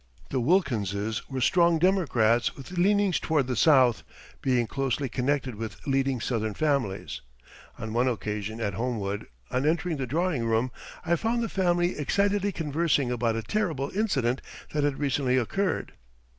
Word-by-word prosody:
The 130 - +1
Wilkinses 110 - 0
were 135 -2 -3
strong 170 +4 +4
Democrats 125 - +2
with 135 +4 -10
leanings 195 +1 +2
toward 155 -4 +1
the 125 0 -2
South, 130 -3 +5 0.4
being 125 -3 +2
closely 135 +2 -1
connected 130 +1 -1
with 110 +1 -6
leading 135 -2 +1
Southern 110 -3 -2
families. 140 -11 -1 0.6
On 110 -1 -5
one 120 +2 +2
occasion 110 -2 -3
at 105 -4 -1
Homewood, 105 -2 -3 0.2
on 130 - 0
entering 170 0 0
the 130 -2 -3
drawing 160 -1 0
room, 115 +2 +1 0.3
I 170 +1 +3
found 230 +5 0
the 225 - -2
family 175 -2 +1
excitedly 200 +6 +1
conversing 150 -5 0
about 115 -2 0
a 115 - -3
terrible 160 - -1
incident 140 - 0 0.3
that 150 -1 +1
had 145 -2 0
recently 135 -2 +1
occurred. 185 - -1
135 Hz, 150 wpm, -27 LUFS, 120-170 Hz, 0.6 s, South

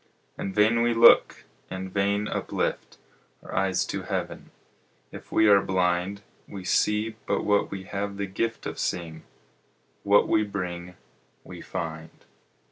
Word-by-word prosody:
In 95 - -4
vain 110 +3 +3
we 120 0 +2
look, 115 +1 +6 0.3
in 95 0 -5
vain 100 +2 0
uplift - - -3 0.5
Our - - -10
eyes 95 -1 +1
to - - -4
heaven, - - -5 0.6
if - - -11
we 110 - +4
are 100 -1 +6
blind; 95 +1 0 0.2
We 100 -2 -8
see 105 +3 +1
but 100 - 0
what 105 -1 +2
we 95 -1 -6
have 100 +1 -4
the 100 - -2
gift 115 +4 -3
Of - - -5
seeing; 80 -2 -3 0.8
what 100 0 +4
we 110 - +3
bring 90 -3 -5 0.5
we - - -10
find. 80 0 -7
100 Hz, 140 wpm, -26 LUFS, 90-105 Hz, 0.8 s, look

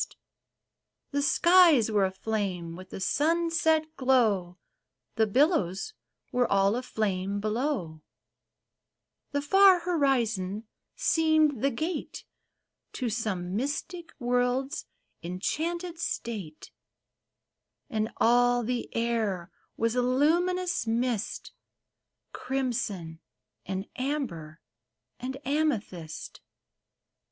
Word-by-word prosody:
THE - - -1
THREE - - -21
SHIPS - - -56
The 285 - 0
skies 330 - +5
were 205 -2 +3
aflame 190 -3 -3
with 185 +1 -11
the - - -7
sunset 320 - +2
glow, 215 -9 +2 0.6
The 220 -1 +2
billows 255 - +1 0.4
were 245 -1 +1
all 200 +1 +3
aflame 205 -5 -2
,below; 215 - -2 1.3
The 285 0 -2
far 385 +3 +6
horizon 235 - 0 0.3
seemed 315 -5 +2
the 275 - +3
gate 315 +7 -4 0.7
To 250 -3 -2
some 195 -5 -2
mystic 325 - -3
world's 250 +2 0 0.3
enchanted 325 - -3
state; 200 - -5 1.2
And 220 0 -1
all 245 +1 +4
the 245 +1 -2
air 220 -6 -1 0.3
was 230 0 +1
a 250 - +2
luminous 345 +6 +1
mist, 230 -1 -1 0.8
Crimson 220 -11 -3 0.5
and 190 +1 -3
amber 235 - -3 0.6
and 260 +1 -5
amethyst. 225 - -2
245 Hz, 90 wpm, -28 LUFS, 200-295 Hz, 1.3 s, far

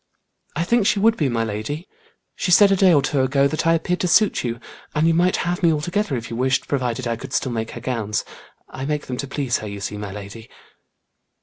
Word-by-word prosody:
"I 165 - 0
think 225 +2 +2
she - - +2
would 220 +3 +4
be, 145 -9 0
my 115 -2 0
lady. 115 - -4 0.5
She - - -3
said 195 +3 +7
a - - +5
day 190 -1 +5
or 145 -4 +4
two 140 - +1
ago, 135 +1 +3
that 155 +3 -2
I 165 - +5
appeared 180 +2 -1
to 180 - 0
suit 210 +5 +3
you, 120 -1 -3 0.4
and 150 +1 +2
you 165 - +4
might 180 +2 +3
have 175 +1 -1
me 170 - +4
altogether 160 +1 -1
if 120 0 -7
you - - -3
wished, 130 +2 0
provided 125 -2 -1
I 115 - 0
could 125 - -9
still 130 - 0
make 110 -1 -3
her - - -7
gowns. 110 -4 -2 0.4
I 130 - -6
make 150 0 -2
them 125 - -5
to 140 - -4
please 135 -3 -1
her, 110 - -6
you 100 0 -6
see, 105 +1 -4
my 105 -2 -6
lady." 105 +3 -9
140 Hz, 240 wpm, -22 LUFS, 115-170 Hz, 0.5 s, said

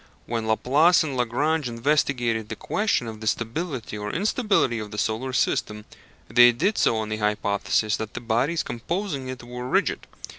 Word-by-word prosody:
When 115 -1 -3
Laplace 145 +11 +4
and 145 -4 -4
Lagrange 130 +4 0
investigated 120 -3 0
the - - -4
question 205 - 0
of 110 -1 -7
the 110 - -5
stability 115 0 -3
or 105 0 -4
instability 200 - +1
of 105 -1 -6
the 105 - -8
solar 110 +5 -1
system, 105 -4 -1 0.4
they 120 +2 +7
did 200 - 0
so 115 - +3
on 110 -1 -3
the 110 - -2
hypothesis 105 0 0
that 110 -1 -6
the - - -3
bodies 120 +8 0
composing 145 - -4
it 130 -1 -7
were 125 +1 -7
rigid. - - 0
120 Hz, 170 wpm, -24 LUFS, 110-145 Hz, 0.4 s, they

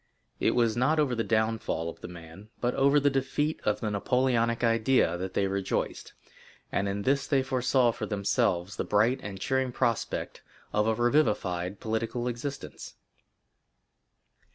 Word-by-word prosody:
It - - +2
was 115 -3 +2
not 130 +6 +2
over 145 -4 +2
the 115 -1 0
downfall 110 -7 0
of 85 - -8
the - - -6
man, 90 +4 -12
but 120 0 0
over 140 +2 +4
the 145 0 +2
defeat 135 +3 -1
of 105 - 0
the 110 - -1
Napoleonic 115 +2 +1
idea, 115 -5 +3
that 95 0 -5
they 100 - +2
rejoiced, 95 0 -2 0.6
and 100 0 0
in 100 +1 -3
this 140 +3 +1
they 135 -2 +2
foresaw 130 -1 +2
for - - -5
themselves 100 -2 0
the - - -1
bright 110 +6 +2
and 100 -2 -7
cheering 130 +4 0
prospect 115 -2 -2 0.3
of 105 +1 +2
a 110 - +2
revivified 105 -8 +1
political 115 +2 -2
existence. 125 +4 -6
115 Hz, 155 wpm, -28 LUFS, 100-130 Hz, 0.6 s, over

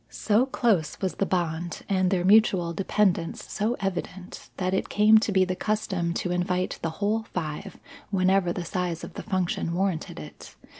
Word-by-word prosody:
So 225 +4 +1
close 205 - +1
was 190 -2 -1
the 195 - -1
bond 170 -2 -2
and 185 -2 +2
their 180 -2 +1
mutual 190 -4 +4
dependence 185 -1 0
so 220 +4 0
evident, 190 -1 -5
that 185 0 -1
it 190 - -1
came 215 +1 +6
to 215 - -1
be 190 -1 +4
the 185 0 -2
custom 190 -5 -1
to 180 - -2
invite 180 +1 -1
the 165 - -1 0.2
whole 220 +2 +1
five 160 -8 -5 0.3
whenever 190 -2 +2
the 175 0 -4
size 180 -2 -3
of - - -8
the - - -6
function 180 -2 -1
warranted 185 - -2
it. 75 0 -11
185 Hz, 170 wpm, -26 LUFS, 175-200 Hz, 0.3 s, came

